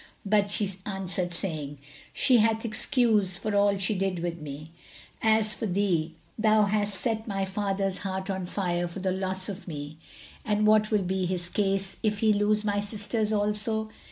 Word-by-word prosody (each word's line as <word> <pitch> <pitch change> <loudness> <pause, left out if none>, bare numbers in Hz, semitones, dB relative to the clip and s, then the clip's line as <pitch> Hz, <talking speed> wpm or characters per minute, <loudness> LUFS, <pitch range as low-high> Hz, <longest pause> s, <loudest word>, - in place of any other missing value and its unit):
But 205 0 +3
she 200 -1 0
answered, 185 -3 -3
saying, 155 -5 -4 0.3
"She 255 -3 +4
hath 225 +1 +2
excuse 215 -5 +2
for 215 +1 -2
all 200 0 +4
she 195 +3 0
did 190 -2 -1
with 170 0 -3
me. 150 +2 -8 0.5
As 220 -1 +3
for 220 - -3
thee, 175 -4 0 0.2
thou 215 -1 +5
hast 205 -1 0
set 220 0 -2
my 195 -2 -1
father's 195 -1 -1
heart 190 -1 -3
on 190 -2 -3
fire 175 -2 -1
for 170 - -9
the 190 0 -1
loss 190 0 -2
of 200 -1 -7
me, 150 -1 -6 0.4
and 210 0 +1
what 215 0 +5
will 210 -3 +2
be 185 0 -1
his 175 -1 -2
case, 195 0 0
if 210 -1 +1
he 215 0 +4
lose 210 +1 +2
my 205 -1 +1
sister 205 +2 -2
also?" 210 +1 0
200 Hz, 175 wpm, -27 LUFS, 185-215 Hz, 0.5 s, thou